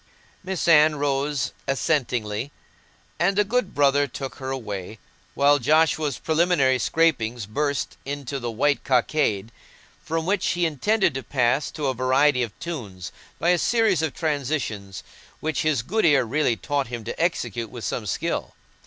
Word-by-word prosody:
Miss 185 -2 -3
Anne 155 -2 +6
rose 140 0 -1 0.2
assentingly, 125 -5 -1 0.7
and 195 +3 +2
the 210 - +5
good 225 -1 -1
brother 145 0 +3
took 135 -1 -7
her 130 -1 -5
away, 110 -6 -5 0.4
while 145 +1 +4
Joshua's 155 0 +2
preliminary 160 -5 +2
scrapings 120 -8 +1
burst 145 +7 -2
into 140 -1 -4
the 120 -1 -3
"White 140 +6 +1
Cockade," 120 -5 +1 0.5
from 165 0 -2
which 195 +1 0
he 175 0 +1
intended 170 - +1
to 135 - -3
pass 130 +1 +1
to 150 - -5
a 135 - +1
variety 130 +2 +3
of 115 -4 -4
tunes, 105 - -6 0.3
by 170 - +1
a 180 -1 +4
series 220 -7 +2
of 160 -4 -2
transitions 135 - -3 0.4
which 155 0 -1
his 150 -7 +1
good 215 - 0
ear 145 -5 +5
really 130 0 +1
taught 140 +2 -2
him 120 -1 -6
to - - -6
execute 120 - -1
with 120 +1 -9
some 105 - -3
skill. - - -2
140 Hz, 155 wpm, -24 LUFS, 120-160 Hz, 0.7 s, Anne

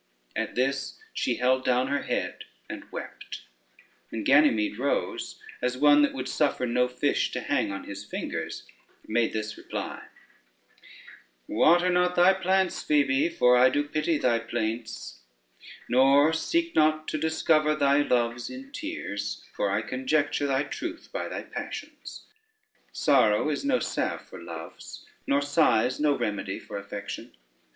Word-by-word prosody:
At - - -3
this 135 +1 -1 0.2
she 120 - 0
held 130 +1 +2
down 125 0 +2
her 145 0 0
head - - -3 0.2
and - - -9
wept, - - -8 0.7
and 110 -2 -4
Ganymede 115 -7 +4
rose 140 +2 -2 0.2
as 125 0 -1
one 145 +1 +6
that 145 - +2
would 130 -1 -4
suffer 145 -4 0
no 125 +1 +2
fish 125 0 0
to - - -1
hang - - 0
on 100 - -5
his 100 0 -7
fingers, - - -5 0.4
made 115 +1 +1
this 105 -1 -4
reply: - - -6 1.4
"Water 175 +2 +4
not 180 0 +2
thy 180 +2 +6
plants, 190 0 +1
Phoebe, 140 0 +2
for 125 -6 +4
I 125 +1 +6
do 145 +3 +1
pity 155 +2 0
thy 120 -4 +2
plaints, 115 - -4 0.7
nor 135 +5 +5
seek 335 - 0
not 155 0 +2
to 155 - -2
discover 155 -1 +2
thy 140 -1 +3
loves 120 -3 0
in 270 +1 -9
tears, 105 - -5
for 100 - 0
I 100 +3 0
conjecture 145 +4 0
thy 135 0 +1
truth 335 - -6
by - - -3
thy - - -5
passions: - - -8 0.7
sorrow 110 0 +3
is 145 - -3
no 280 -2 +2
salve - - -2
for - - -11
loves, - - -9 0.2
nor 140 +1 +2
sighs 130 -5 +2
no 150 -1 +2
remedy 100 -2 -2
for 100 - -7
affection. 100 -5 -7
135 Hz, 145 wpm, -27 LUFS, 120-155 Hz, 1.4 s, one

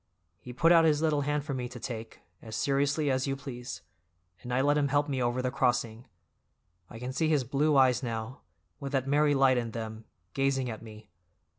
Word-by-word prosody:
He 125 - -10
put 165 +7 +3
out 165 -1 +7
his 155 -1 +3
little 150 -2 +2
hand 145 0 -1
for 145 - -3
me 125 -2 -3
to 125 - -9
take, 115 -2 -7 0.2
as 110 -2 -8
seriously 140 +2 +1
as 130 +1 0
you 135 - -1
please, 125 -3 -8 0.6
and 125 - -7
I 125 - +1
let 145 +2 +3
him 145 -1 +2
help 145 +1 +1
me 135 -3 -2
over 120 +1 0
the 125 - 0
crossing. 120 -2 0 0.8
I - - -10
can 125 +2 -5
see 155 +3 +1
his 150 -4 +2
blue 145 +4 +1
eyes 130 -1 +4
now, 115 +1 -5 0.4
with 140 0 -6
that 135 -1 +1
merry 145 +1 +3
light 135 -2 +4
in 120 -1 -3
them, 110 -1 -6 0.3
gazing 135 -2 0
at 110 - -8
me. 110 -3 -13
130 Hz, 205 wpm, -29 LUFS, 120-145 Hz, 0.8 s, out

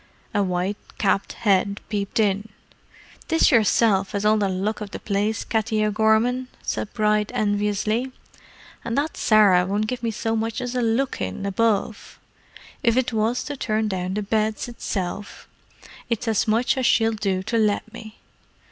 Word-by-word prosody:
A 205 - +2
white 185 +1 -1 0.2
capped 195 -1 0
head 200 -1 +1
peeped 205 0 -2
in. 205 0 +1 0.8
"'Tis 325 -1 +4
yersilf 210 -3 +3
has 200 0 -2
all 215 +1 +4
the 200 -2 +1
luck 195 +4 -2
of 210 - -5
the - - -7
place, 205 +1 -1
Katty 220 -1 0
O'Gorman!" 220 +4 +2 0.2
said 205 - -3
Bride 210 -1 +1
enviously. 210 +3 0 0.7
"An' 230 0 -3
that 295 +3 -1
Sarah 205 -5 +5
won't 200 +3 -1
give 245 +2 -4
me 230 - -1
so 225 +1 -2
much 225 +1 -2
as 245 -1 -4
a 250 - 0
look 235 +3 0
in, 95 - -4
above: 210 +1 -1 0.6
if 235 -2 +2
it 255 -2 +1
was 225 +3 0
to 290 - -5
turn 220 -4 -1
down 185 -1 -3
the 210 - -1
beds, 215 +2 -1
itself, 200 -4 -5 0.6
it's 230 +1 -2
as 220 -1 +1
much 230 +5 +2
as 255 - +2
she'll 225 -1 +3
do 195 -3 -1
to 230 +3 0
let 215 +1 0
me. 220 -1 -10
215 Hz, 165 wpm, -23 LUFS, 200-230 Hz, 0.8 s, Sarah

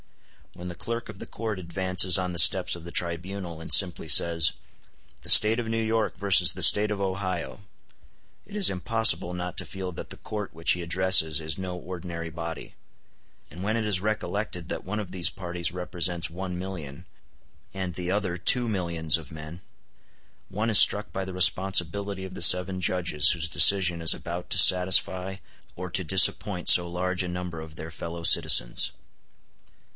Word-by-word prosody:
When 90 - -11
the 90 - -8
clerk 115 +6 -7
of 95 - -12
the - - -10
court 110 -3 -6
advances 90 0 +1
on 90 -1 -4
the 85 - -2
steps 90 +2 +3
of 85 - -13
the 85 - -11
tribunal, 85 0 -4
and 80 - -9
simply 90 -4 +4
says, 85 +1 +2 0.7
"The - - -10
State 110 +2 +6
of 120 - -5
New 115 0 -3
York 110 -2 -3
versus 100 +1 +4
the - - -3
State 105 +1 +5
of 105 - -4
Ohio," 95 -2 -5 0.8
it 200 +2 -13
is 205 -3 +4
impossible 110 -2 +1
not 90 0 -7
to - - -5
feel 95 -1 -8
that - - -9
the - - -9
Court 105 -5 -8
which 80 +1 -1
he 90 - -2
addresses 85 -3 +2
is 80 -1 -5
no 90 -1 -7
ordinary 85 -2 -8
body; 85 0 -8 0.8
and 90 +5 -11
when 110 +3 -2
it 110 - -4
is 100 -4 0
recollected 105 -4 -5
that - - -6
one 105 +4 -6
of 100 -4 -8
these 90 -2 0
parties 85 -2 -5
represents 90 -1 -3
one 90 +1 -7
million, 90 -7 -9 0.7
and 95 -2 -6
the 90 +1 -5
other 95 -3 -3
two 120 +7 +2
millions 85 -6 -1
of 80 -4 -13
men, 80 +2 -11 0.9
one 110 +4 -4
is 110 - +3
struck 105 +1 +2
by 95 - -4
the 95 0 -9
responsibility 95 +1 0
of 95 - -11
the - - -9
seven 90 +2 +4
judges 85 -5 +1
whose 85 -2 -3
decision 85 0 +5
is 80 - +2
about 85 +1 -8
to - - -1
satisfy 95 +1 +3 0.4
or 90 +1 -7
to 95 - -1
disappoint 90 +2 +2
so 85 -1 +8
large 90 +1 -3
a - - -6
number 90 -2 -7
of 80 -1 -13
their 80 +1 -10
fellow 85 +1 -9
citizens. - - +3
90 Hz, 180 wpm, -24 LUFS, 85-95 Hz, 0.9 s, so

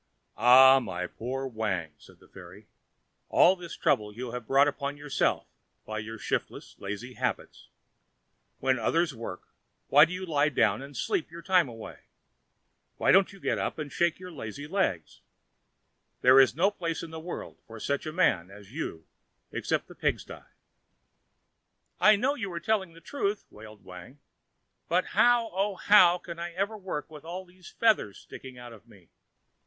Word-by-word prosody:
"Ah, 130 +2 +8
my 90 -7 -4
poor 130 +8 -5
Wang," 105 - -3
said - - -18
the - - -20
fairy, 95 +3 -13 0.6
"all 185 - +5
this 175 -2 -9
trouble 105 -1 +1
you 120 +3 -7
have 125 -2 -7
brought 140 +2 +5
upon 140 0 -3
yourself 145 -1 0 0.4
by 110 0 -4
your 110 +2 -7
shiftless, - - -4
lazy 105 +6 -6
habits. - - -4 0.9
When 130 -1 +1
others 165 +7 +1
work, 115 -6 -7 0.5
why 145 +2 +8
do 165 - -10
you 185 +1 -5
lie 150 -3 +2
down 135 -1 +1
and 140 -1 -10
sleep 155 - -1
your 170 +1 -11
time 180 -7 +3
away? 115 -1 -10 1.0
Why - - +3
don't 195 +1 +5
you 195 - -14
get - - -1
up - - -3
and 150 -2 -6
shake 170 -1 +1
your 185 0 -10
lazy 140 -1 -7
legs? 150 - -2 1.0
There 130 +1 +7
is 130 -2 +5
no 190 +6 +3
place 170 -5 -4
in 165 - -8
the 160 - -7
world 170 +2 -8
for 115 0 -10
such 140 +6 -2
a - - -3
man 110 - +1
as 100 +2 -14
you 80 - -5 0.5
except - - -2
the - - -12
pig - - -1
sty." - - -11 1.5
"I 210 +4 +7
know 260 +7 +1
you 225 -9 -5
are 170 - -3
telling 190 -2 -1
the 165 - -15
truth," 200 - -3
wailed 110 0 -13
Wang, 90 +9 -12 0.7
"but - - +2
how, 240 -2 +4
oh, 195 +2 -1
how 180 -3 +6
can 170 -1 -9
I 170 0 -5
ever 200 +5 -2
work 185 -7 -6
with 150 -2 -11
all 180 +3 -7
these 180 0 -16
feathers 215 - +1
sticking 130 -1 -11
out 120 -1 -10
of 110 +1 -17
me? 95 -7 -20
145 Hz, 170 wpm, -28 LUFS, 115-180 Hz, 1.5 s, Ah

